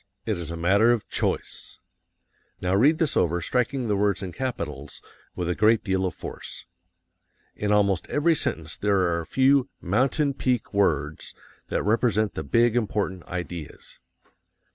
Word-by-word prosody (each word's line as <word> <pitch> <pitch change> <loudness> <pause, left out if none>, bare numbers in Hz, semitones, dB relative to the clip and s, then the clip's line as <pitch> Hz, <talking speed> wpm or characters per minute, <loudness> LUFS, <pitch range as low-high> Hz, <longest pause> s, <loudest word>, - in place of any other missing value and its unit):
It 110 - 0
is 85 -3 -6
a 85 - -5
matter 100 +7 +4
of 120 -3 -1
CHOICE." - - -3 0.8
Now 90 +1 -1
read 140 +11 +4
this 160 -3 0
over, 85 0 +2
striking 125 - -1
the 105 - +1
words 100 -1 +1
in 95 - -5
capitals 80 - -5 0.4
with 90 - -3
a 90 - +1
great 110 +3 +3
deal 95 -2 0
of - - -6
force. - - -7 0.9
In 105 0 -1
almost 100 -3 +2
every 160 +3 +3
sentence 80 - -2
there 100 0 +1
are 85 -2 +1
a 80 - -10
few 135 - +3
MOUNTAIN 135 - +1
PEAK 125 -5 -1
WORDS 75 -7 0 0.3
that - - -1
represent 110 -1 +1
the - - -4
big, 115 - +2
important 100 -6 -1
ideas. 85 -3 -7
100 Hz, 155 wpm, -25 LUFS, 85-120 Hz, 0.9 s, matter